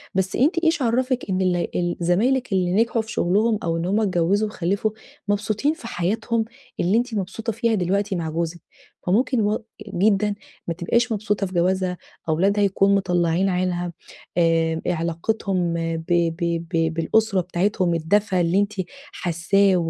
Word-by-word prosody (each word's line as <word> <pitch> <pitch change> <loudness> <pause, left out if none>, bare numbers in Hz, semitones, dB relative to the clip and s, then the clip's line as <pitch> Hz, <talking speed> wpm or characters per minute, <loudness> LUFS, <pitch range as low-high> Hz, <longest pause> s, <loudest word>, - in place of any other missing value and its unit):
بس 190 0 0
أنتِ 305 +8 +3
إيش 325 -1 +2
عرفِك 255 +1 +1
إن 190 0 0
ال 180 -2 0
ال 175 0 -1
زمايلك 225 +8 +1
اللي 180 -2 +1
نجحوا 230 +3 +2
في 220 - -9
شغلهم 215 +4 +2
أو 165 0 0
إن 165 - -2
هم 200 +4 +1
اتجوزوا 195 +1 +2
وخلفوا 200 +3 -1 0.4
مبسوطين 210 +8 +1
في 320 -8 -10
حياتهم 225 +5 -1 0.3
اللي 190 +5 +3
أنتِ 240 0 -1
مبسوطة 210 +3 -3
فيها 230 0 +1
دلوقتي 195 +1 0
مع 165 -2 -2
جوزِك؟ 165 +1 -3 0.5
فممكن 240 +6 +2
و 210 +1 0 0.3
جدًا 205 +2 +2 0.3
ما 170 - 0
تبقاش 235 +8 0
مبسوطة 205 -2 0
في 185 - -11
جوازها 180 +1 +1 0.3
أولادها 195 +6 +2
يكون 200 0 +3
مطلعين 180 -1 +1
عينها 180 -1 -1 0.4
آآ، 165 -1 +2
علاقتهم 175 +2 -1 0.2
ب 160 - -7
ب 170 -1 0
ب 165 -1 +1
بالأسرة 190 +4 +2
بتاعتهم 180 0 0
الدفا 185 +3 +1
اللي 170 +3 +2
أنتِ 205 +1 0 0.4
حاساه 190 +3 +2
190 Hz, 150 wpm, -23 LUFS, 175-215 Hz, 0.5 s, أنتِ